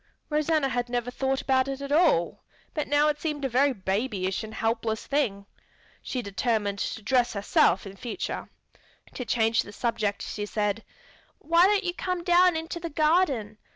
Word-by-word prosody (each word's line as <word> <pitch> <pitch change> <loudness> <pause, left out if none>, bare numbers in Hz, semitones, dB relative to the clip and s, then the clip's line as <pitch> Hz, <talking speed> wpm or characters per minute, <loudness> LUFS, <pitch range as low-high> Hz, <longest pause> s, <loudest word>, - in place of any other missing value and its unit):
Rosanna 305 -1 +2
had 245 -1 -2
never 245 0 -2
thought 265 +1 -1
about 260 -1 +2
it 270 0 -4
at 280 0 -6
all, 300 - +2 0.3
but 300 - -2
now 290 +1 +3
it 295 -1 -1
seemed 300 -3 -2
a - - +3
very 270 +4 +3
babyish 195 -2 -2
and 220 - -7
helpless 225 -1 -1
thing. 215 -9 -1 0.6
She 250 -2 -4
determined 205 -1 -1
to 220 - -3
dress 245 +1 +2
herself 200 -2 +2
in 195 0 -9
future. 240 - -5 0.6
To 250 - -4
change 225 -1 +2
the 205 - -10
subject 210 -2 -1
she 205 0 -4
said, 210 +1 -1 0.5
"Why 335 +3 +4
don't 410 0 +2
you 350 -1 -1
come 365 -1 -3
down 355 0 +5
into 325 +2 -5
the 335 0 -5
garden? 300 - +1
255 Hz, 170 wpm, -27 LUFS, 215-300 Hz, 0.6 s, down